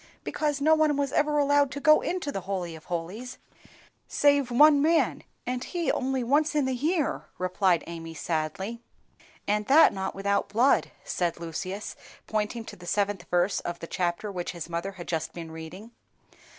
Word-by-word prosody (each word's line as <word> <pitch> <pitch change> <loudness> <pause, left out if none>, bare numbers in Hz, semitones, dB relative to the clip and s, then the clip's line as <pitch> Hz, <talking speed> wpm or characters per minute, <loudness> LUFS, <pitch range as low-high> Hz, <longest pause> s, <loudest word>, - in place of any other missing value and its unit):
"Because 295 -2 -1
no 310 +3 +4
one 310 -2 +3
was 280 -2 0
ever 295 +1 +2
allowed 285 -1 +3
to 285 - -4
go 305 +1 +6
into 350 -5 -2
the 195 - -4
Holy 180 -3 -4
of 155 - -13
holies 185 +9 -5 0.7
save 285 -3 +3
one 290 +4 +6
man, 325 +2 +2 0.2
and 250 0 -2
he 345 +1 -1
only 260 -1 -1
once 295 +5 +2
in 295 -3 +2
the 260 - 0
year," 305 +5 0
replied 185 -1 +1
Amy, 165 -1 -7
sadly. 170 +9 -3 0.7
"And 210 0 0
that 300 +4 +7
not 190 0 -3
without 200 +1 0
blood," 235 +7 +3
said 175 -2 -2
Lucius, 185 +5 -5 0.3
pointing 220 +2 -2
to - - -9
the 175 -1 -13
seventh 205 +1 0
verse 180 +3 +2
of 175 0 -5
the - - -7
chapter 175 +4 -2
which 180 -2 -4
his 170 -2 -6
mother 170 +3 -4
had 175 -2 -9
just 165 -2 -2
been 165 -2 -7
reading. 160 +8 -9
210 Hz, 175 wpm, -27 LUFS, 175-285 Hz, 0.7 s, that